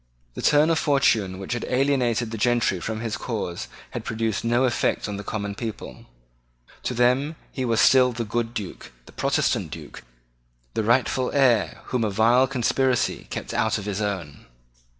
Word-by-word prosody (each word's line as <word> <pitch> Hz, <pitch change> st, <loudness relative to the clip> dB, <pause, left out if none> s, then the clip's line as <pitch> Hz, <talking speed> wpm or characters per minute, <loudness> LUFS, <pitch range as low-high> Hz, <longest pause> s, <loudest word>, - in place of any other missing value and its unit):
The -, -, -6 dB
turn 150 Hz, +2 st, +4 dB
of 160 Hz, -, +2 dB
fortune 115 Hz, -, +2 dB
which 95 Hz, +5 st, -4 dB
had 120 Hz, -, -3 dB
alienated 125 Hz, -4 st, +1 dB
the 115 Hz, -, -4 dB
gentry 120 Hz, -5 st, +2 dB
from 110 Hz, +5 st, -4 dB
his 115 Hz, -2 st, -3 dB
cause 105 Hz, -8 st, -4 dB, 0.2 s
had -, -, -5 dB
produced 110 Hz, -1 st, -2 dB
no 120 Hz, +2 st, +2 dB
effect 125 Hz, -3 st, 0 dB
on 105 Hz, -1 st, -4 dB
the 100 Hz, -, -6 dB
common 100 Hz, 0 st, -4 dB
people. 110 Hz, 0 st, -7 dB, 0.8 s
To 125 Hz, -, -1 dB
them 125 Hz, +6 st, +2 dB, 0.2 s
he 130 Hz, -, -3 dB
was 115 Hz, -2 st, +1 dB
still 130 Hz, -1 st, +6 dB
the 120 Hz, -1 st, -4 dB
good 115 Hz, +2 st, -2 dB
Duke, 100 Hz, -5 st, -6 dB
the -, -, -15 dB
Protestant -, -, 0 dB
Duke, -, -, -9 dB, 0.7 s
the 110 Hz, -, 0 dB
rightful 125 Hz, +2 st, +2 dB
heir 125 Hz, -7 st, +3 dB
whom 125 Hz, -2 st, -1 dB
a 110 Hz, -, +1 dB
vile 115 Hz, +6 st, +4 dB
conspiracy 130 Hz, 0 st, 0 dB
kept -, -, -5 dB
out 110 Hz, 0 st, +1 dB
of 105 Hz, -, -6 dB
his 105 Hz, 0 st, -2 dB
own. 95 Hz, -, -4 dB
115 Hz, 170 wpm, -24 LUFS, 105-125 Hz, 0.8 s, still